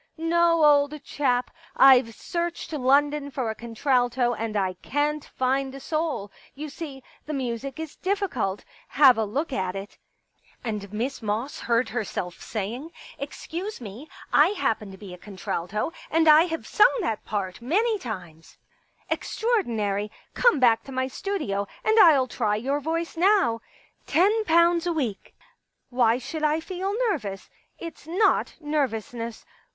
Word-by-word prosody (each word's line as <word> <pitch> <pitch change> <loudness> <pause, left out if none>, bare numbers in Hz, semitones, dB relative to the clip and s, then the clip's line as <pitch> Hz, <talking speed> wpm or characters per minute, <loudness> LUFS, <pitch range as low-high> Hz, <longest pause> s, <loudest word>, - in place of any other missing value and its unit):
* - - -47
No, 335 0 +3
old 290 0 +3
chap, 250 -4 0 0.3
I've 255 -4 +6
searched 340 +3 -4
London 285 +1 +2
for 260 -5 -2
a - - -7
contralto 245 +1 +1
and 220 -1 -3
I 190 -2 0
can't 295 +1 -1
find 265 +1 -1
a - - -7
soul. 310 -9 -2 0.2
You 300 +2 -6
see, 280 -3 -8 0.2
the 305 - -3
music 265 +2 -4
is 320 -2 -7
difficult; 370 - -2 0.2
have 270 -3 +6
a 220 - 0
look 275 +8 -2
at 185 -4 -2
it.' 195 +1 -8 0.3
" - - -33
And 210 -3 -4
Miss 245 +6 -3
Moss 225 +6 -3
heard 235 0 +1
herself 200 -6 -4
saying: 230 +8 -4 0.3
Excuse 340 +8 -6
me, 235 +6 -9 0.2
I - - +7
happen 220 -6 0
to 190 - -11
be 190 -2 -10
a 180 - -11
contralto, 200 - -4 0.2
and 325 0 +3
I 310 +2 +8
have 325 -2 -4
sung 425 - +5
that 225 - -2
part 195 -1 -4
many 420 - +1
times.... 180 - -8 0.5
Extraordinary! 220 - 0 0.2
* - - -41
Come 485 - +4
back 230 -3 +4
to 275 - -9
my 260 0 0
studio 255 - -3 0.2
and 440 +1 +4
I'll 285 -9 +7
try 220 -4 0
your 270 +7 -1
voice 330 +3 -3
now.'... 330 - +3 0.5
Ten 420 +6 +3
pounds 340 0 +4
a 345 - +1
week.... 250 -11 -3 0.6
Why 240 -2 +3
should 310 +5 -6
I 305 +1 +2
feel 375 +3 -4 0.2
nervous? 200 - -5 0.3
It's 335 -2 -9
not 390 +5 +2
nervousness. 240 -6 -3
270 Hz, 150 wpm, -25 LUFS, 220-320 Hz, 0.6 s, I